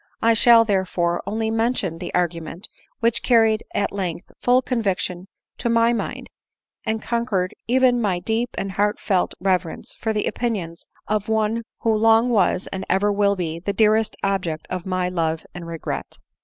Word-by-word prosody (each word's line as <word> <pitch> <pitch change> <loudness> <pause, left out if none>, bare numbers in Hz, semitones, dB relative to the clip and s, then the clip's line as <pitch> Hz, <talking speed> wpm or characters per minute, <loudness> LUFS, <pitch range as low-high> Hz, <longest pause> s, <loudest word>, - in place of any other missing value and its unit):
I 230 0 +4
shall 230 0 +6
therefore 180 -4 0
only 220 +2 -1
mention 225 -7 -1
the 180 - -5
argument 175 +2 -2 0.3
which 230 0 +1
carried 225 -3 +4
at 200 - 0
length 185 -4 -4
full 250 +1 +3
conviction 195 -7 -1 0.3
to 240 - -1
my 230 0 +4
mind, 235 - -4 0.5
and 220 -1 -2
conquered 230 -6 -1
even 250 0 +3
my 195 -5 +1
deep 225 +6 -1
and 195 - -2
heartfelt 205 -1 0
reverence 185 -3 -1
for 225 - -2
the 215 -1 -1
opinions 190 -9 -3 0.2
of 215 +1 -1
(me 220 +1 +1 0.2
who 225 - +2
long 225 +2 +4
was, 190 -4 +2
and 190 0 -4
ever 200 +3 +2
will 200 0 +2
be, 165 -3 -3
the 200 +4 -3
deafest 220 +1 +3
object 180 -5 -1
of 185 0 -4
my 185 -1 0
love 165 -3 -1
and 175 -1 -8
regret. 165 -1 -5
205 Hz, 160 wpm, -22 LUFS, 180-225 Hz, 0.5 s, shall